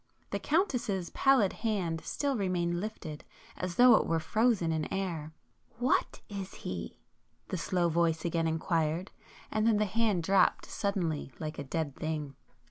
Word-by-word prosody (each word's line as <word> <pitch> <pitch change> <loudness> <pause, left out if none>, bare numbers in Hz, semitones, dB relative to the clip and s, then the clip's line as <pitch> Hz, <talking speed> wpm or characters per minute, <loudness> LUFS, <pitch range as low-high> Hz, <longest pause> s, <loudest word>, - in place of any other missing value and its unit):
The - - -1
Countess's 250 - 0
pallid 265 -8 +4
hand 185 -8 -1
still 285 -2 -1
remained 175 -4 0
lifted, 180 -7 -6 0.3
as 180 -1 -4
though 250 0 +8
it - - 0
were 165 0 +1
frozen 215 -1 +2
in 160 -1 -2
air. 170 -6 -3 0.5
"What 250 +2 +1
is 195 -2 -6
he?" 90 -2 -5 0.5
the 185 - -2
slow 175 +1 +1
voice 165 -1 +1
again 165 -1 +1
inquired,—and 165 +6 -2
then 225 -2 +4
the 210 - +2
hand 210 -4 +1
dropped 195 +3 +3
suddenly 175 -9 -2
like 155 0 -5
a - - -3
dead 145 0 -3
thing. 155 -3 -3
180 Hz, 145 wpm, -31 LUFS, 160-215 Hz, 0.5 s, though